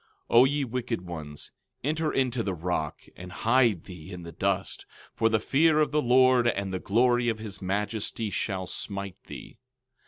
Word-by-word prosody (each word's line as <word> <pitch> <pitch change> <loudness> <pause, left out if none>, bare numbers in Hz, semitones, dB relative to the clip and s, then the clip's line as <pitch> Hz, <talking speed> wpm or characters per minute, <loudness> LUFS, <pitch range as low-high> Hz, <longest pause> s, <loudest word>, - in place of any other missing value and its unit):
12:10 - - +5
O 125 - +8
ye 145 +1 +1
wicked 120 -4 -3
ones, 80 -5 -8 0.3
enter 155 +2 0
into 130 -2 0
the 95 -4 -2
rock, 80 -3 -3
and 90 0 -9
hide 115 -3 +2
thee 90 -1 -11
in 90 -2 -7
the 85 - -8
dust, 95 +1 -2 0.3
for 115 - +2
the 110 -1 +2
fear 155 +7 +3
of 155 - +2
the 150 0 +2
Lord 125 -1 +5
and 100 -4 -1
the 95 - -1
glory 120 +4 +2
of 110 - -1
his 105 -2 -7
majesty 105 +3 -2
shall 95 -3 -2
smite 100 0 -6
thee. - - -10
110 Hz, 180 wpm, -27 LUFS, 95-125 Hz, 0.3 s, O